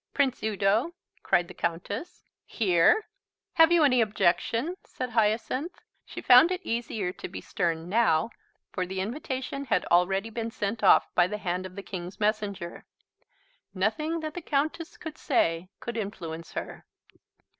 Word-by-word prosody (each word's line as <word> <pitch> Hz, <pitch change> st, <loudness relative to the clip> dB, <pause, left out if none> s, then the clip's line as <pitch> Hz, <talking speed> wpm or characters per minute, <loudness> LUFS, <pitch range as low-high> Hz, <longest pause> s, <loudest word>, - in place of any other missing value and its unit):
"Prince 270 Hz, -3 st, +1 dB
Udo?" 215 Hz, -, +1 dB, 0.3 s
cried 175 Hz, -, +2 dB
the 185 Hz, -, -10 dB
Countess. 180 Hz, -, -4 dB, 0.2 s
"Here?" 200 Hz, -, +3 dB, 0.5 s
"Have 325 Hz, 0 st, +6 dB
you 340 Hz, -2 st, +5 dB
any 255 Hz, -4 st, +4 dB
objection?" 225 Hz, -, +1 dB
said 250 Hz, -1 st, -6 dB
Hyacinth. 225 Hz, +8 st, 0 dB, 0.3 s
She -, -, -7 dB
found 255 Hz, +6 st, +8 dB
it 365 Hz, 0 st, -2 dB
easier 230 Hz, -5 st, -2 dB
to -, -, -7 dB
be -, -, -7 dB
stern 165 Hz, -2 st, -2 dB
now, 200 Hz, -2 st, +2 dB, 0.4 s
for 185 Hz, -1 st, -2 dB
the 190 Hz, +1 st, -4 dB
invitation 260 Hz, +5 st, -4 dB
had 230 Hz, -, +1 dB
already 190 Hz, +5 st, +2 dB
been 230 Hz, 0 st, -3 dB
sent 215 Hz, 0 st, -3 dB
off 195 Hz, -, +5 dB
by 175 Hz, -1 st, +4 dB
the 210 Hz, +2 st, -4 dB
hand 185 Hz, -1 st, -3 dB
of 185 Hz, -, -15 dB
the 200 Hz, -, -7 dB
King's 180 Hz, -1 st, -7 dB
Messenger. 205 Hz, -4 st, -2 dB, 0.9 s
Nothing 305 Hz, -, 0 dB
that 310 Hz, -1 st, -4 dB
the 355 Hz, -, -6 dB
Countess 315 Hz, +2 st, -2 dB
could 310 Hz, -1 st, -8 dB
say 170 Hz, -, +1 dB
could 235 Hz, -1 st, -5 dB
influence 170 Hz, -6 st, -6 dB
her. -, -, -6 dB
215 Hz, 150 wpm, -27 LUFS, 185-265 Hz, 0.9 s, found